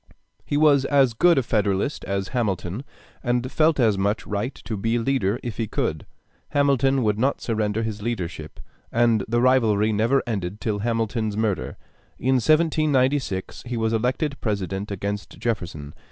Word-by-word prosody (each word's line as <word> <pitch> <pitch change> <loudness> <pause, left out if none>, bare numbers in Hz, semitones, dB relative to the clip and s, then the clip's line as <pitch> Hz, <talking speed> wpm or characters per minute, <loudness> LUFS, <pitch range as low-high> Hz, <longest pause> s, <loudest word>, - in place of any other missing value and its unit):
He 145 - -1
was 145 -3 +5
as 135 -4 +3
good 170 +8 +4
a 135 - +3
Federalist 105 +3 0
as 100 -1 -2
Hamilton, 105 -2 -2 0.4
and 120 +1 -1
felt 155 -2 +3
as 110 -5 +3
much 100 +2 0
right 105 +6 -3
to 110 - -6
be 115 +4 0
leader 115 -3 0
if 120 -4 -5
he 115 - -1
could; - - -2 0.4
Hamilton 135 -2 +2
would 105 -1 +1
not 135 +4 +1
surrender 110 -1 -1
his 110 -2 -4
leadership, 90 -9 -4 0.3
and 115 -3 +3
the 120 +2 +1
rivalry 110 -4 +3
never 115 +6 +2
ended 100 -4 -3
till 105 -2 -2
Hamilton's 110 -1 -1
murder. 110 -5 -1 0.4
In 130 +2 +2
1796 145 - +1
he 120 -1 -3
was 110 0 0
elected 130 +6 -1
President 100 -2 -2
against 100 +1 -4
Jefferson. 85 -10 -4
115 Hz, 155 wpm, -24 LUFS, 105-130 Hz, 0.4 s, was